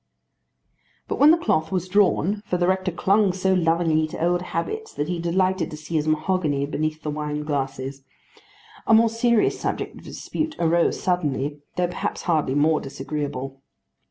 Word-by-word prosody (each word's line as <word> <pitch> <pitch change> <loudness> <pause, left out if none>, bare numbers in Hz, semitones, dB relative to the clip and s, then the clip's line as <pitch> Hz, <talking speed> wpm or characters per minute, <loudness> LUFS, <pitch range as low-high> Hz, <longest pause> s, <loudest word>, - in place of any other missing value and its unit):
But - - -3
when 290 - +8
the 330 - +6
cloth 190 - 0
was 185 -1 -1
drawn, 200 +1 +2
for 180 - 0
the 175 0 +1
rector 185 0 +1
clung 195 +3 +2
so 190 0 +1
lovingly 165 -2 +2
to 160 - -3
old 175 0 +1
habits 435 - -4
that 145 - -2
he 175 0 -2
delighted 185 +2 +1
to 150 - -7
see 155 +2 -9
his 155 -1 +1
mahogany 155 -2 0
beneath 155 +2 -3
the 150 - -2
wine 150 0 -3
glasses, 135 -2 -3 0.9
a 225 - +6
more 225 +1 +5
serious 230 -1 +2
subject - - -3
of - - -16
dispute 310 -1 -4
arose 170 0 +2
suddenly, 150 -5 -1 0.2
though 180 - +1
perhaps 175 - -4
hardly 155 -6 +1
more 155 +2 +3
disagreeable. 135 -1 -5
170 Hz, 165 wpm, -23 LUFS, 150-185 Hz, 0.9 s, when